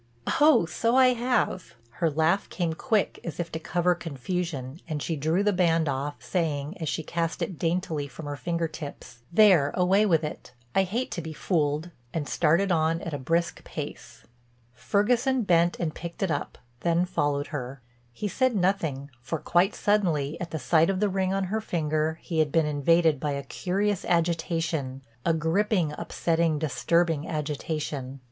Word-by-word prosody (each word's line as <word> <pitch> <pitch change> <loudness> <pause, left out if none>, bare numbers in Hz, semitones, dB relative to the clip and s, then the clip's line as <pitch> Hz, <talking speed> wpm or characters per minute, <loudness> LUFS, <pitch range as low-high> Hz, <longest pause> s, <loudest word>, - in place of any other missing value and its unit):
"Oh, 300 - +6
so 230 +9 0
I 260 -1 +7
have." 240 - -1 0.2
Her 165 - +3
laugh 160 +6 +1
came 170 -3 -1
quick 215 +4 0
as 170 - -6
if 170 -1 -3
to 160 - -4
cover 175 +2 +1
confusion 165 -3 -4
and 155 -3 -3
she 165 +3 -2
drew 160 +6 +1
the 205 0 +2
band 165 -3 +2
off, 140 +1 -2
saying, 155 -2 -1
as 160 -3 -2
she 160 - -2
cast 170 +1 -2
it 180 - -5
daintily 165 -4 -1
from 140 +4 -10
her 145 0 -4
finger 170 +5 -1
tips, 145 -6 -9
"There—away 185 +1 +5
with 165 -4 +3
it. 150 -4 -6 0.2
I 195 - +3
hate 235 +8 -2
to 170 - -3
be 160 0 -6
fooled," 155 0 0 0.2
and 150 -3 -2
started 175 +5 +2
on 165 0 +2
at 165 - -5
a 145 - -3
brisk 165 +5 -1
pace. - - -8 0.5
Ferguson 245 - +1
bent 175 -2 +3
and 160 -3 -1
picked 170 +2 -6
it 190 - 0
up, 145 - -3 0.2
then 170 +3 +2
followed 145 -5 -1
her. 130 -1 -5 0.3
He 205 - -4
said 255 +3 +1
nothing 165 -8 0
for 140 +7 -3
quite 175 +6 +2
suddenly, 165 -9 +1
at 175 - -4
the 160 - -3
sight 155 +5 +3
of 190 -1 0
the 210 0 +2
ring 190 -1 0
on 195 0 0
her 215 +4 -2
finger, 155 -4 -1
he 165 -3 -2
had 155 -2 +2
been 165 0 +3
invaded 150 +1 +3
by 145 +1 -1
a 140 0 -3
curious 195 +7 -1
agitation, 165 -5 0 0.2
a 165 - +2
gripping, 170 +1 +1
upsetting, 165 -1 0
disturbing 160 +1 +1
agitation. 150 -3 -3
165 Hz, 170 wpm, -27 LUFS, 150-185 Hz, 0.5 s, I